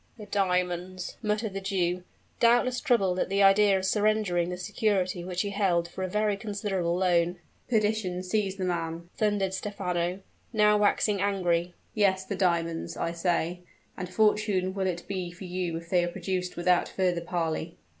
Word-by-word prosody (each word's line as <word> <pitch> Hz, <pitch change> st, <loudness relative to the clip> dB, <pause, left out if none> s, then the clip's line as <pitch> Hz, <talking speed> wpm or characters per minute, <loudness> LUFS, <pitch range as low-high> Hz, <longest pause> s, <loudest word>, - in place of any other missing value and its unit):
"The 215 Hz, -, -9 dB
diamonds!" 180 Hz, -2 st, -1 dB
muttered 210 Hz, -1 st, -1 dB
the 195 Hz, -, -4 dB
Jew, 180 Hz, -2 st, -1 dB, 0.4 s
doubtless 245 Hz, +1 st, +4 dB
troubled 195 Hz, -10 st, +2 dB
at -, -, 0 dB
the 200 Hz, +1 st, +3 dB
idea 195 Hz, 0 st, +6 dB
of 190 Hz, -, -2 dB
surrendering 205 Hz, -4 st, +1 dB
the 180 Hz, -, -4 dB
security 190 Hz, -2 st, 0 dB
which 180 Hz, 0 st, -2 dB
he 205 Hz, -, -3 dB
held 185 Hz, -4 st, +1 dB
for 185 Hz, -, -6 dB
a -, -, 0 dB
very 210 Hz, +2 st, +1 dB
considerable 200 Hz, -4 st, -2 dB
loan. 175 Hz, -1 st, +2 dB, 0.3 s
"Perdition 210 Hz, -5 st, 0 dB
seize 195 Hz, +1 st, -1 dB
the 195 Hz, -, -4 dB
man!" 170 Hz, -1 st, -3 dB
thundered 205 Hz, -3 st, +1 dB
Stephano, 185 Hz, -2 st, -2 dB, 0.3 s
now 210 Hz, -2 st, +4 dB
waxing 205 Hz, -1 st, +2 dB
angry. 180 Hz, -3 st, 0 dB, 0.2 s
"Yes, 190 Hz, -3 st, +2 dB
the 200 Hz, -, -3 dB
diamonds, 170 Hz, -3 st, 0 dB
I 170 Hz, -, -1 dB
say; 170 Hz, 0 st, -1 dB, 0.4 s
and 180 Hz, -1 st, -5 dB
fortunate 210 Hz, -2 st, +2 dB
will 190 Hz, -1 st, -1 dB
it 175 Hz, -1 st, -3 dB
be 185 Hz, -3 st, -3 dB
for 175 Hz, +2 st, -11 dB
you 180 Hz, -2 st, -3 dB
if 170 Hz, 0 st, -10 dB
they 180 Hz, -2 st, +4 dB
are -, -, 0 dB
produced 180 Hz, 0 st, -3 dB
without 175 Hz, 0 st, +2 dB
further 180 Hz, -2 st, 0 dB
parley." 165 Hz, -1 st, -3 dB
185 Hz, 165 wpm, -28 LUFS, 175-205 Hz, 0.4 s, idea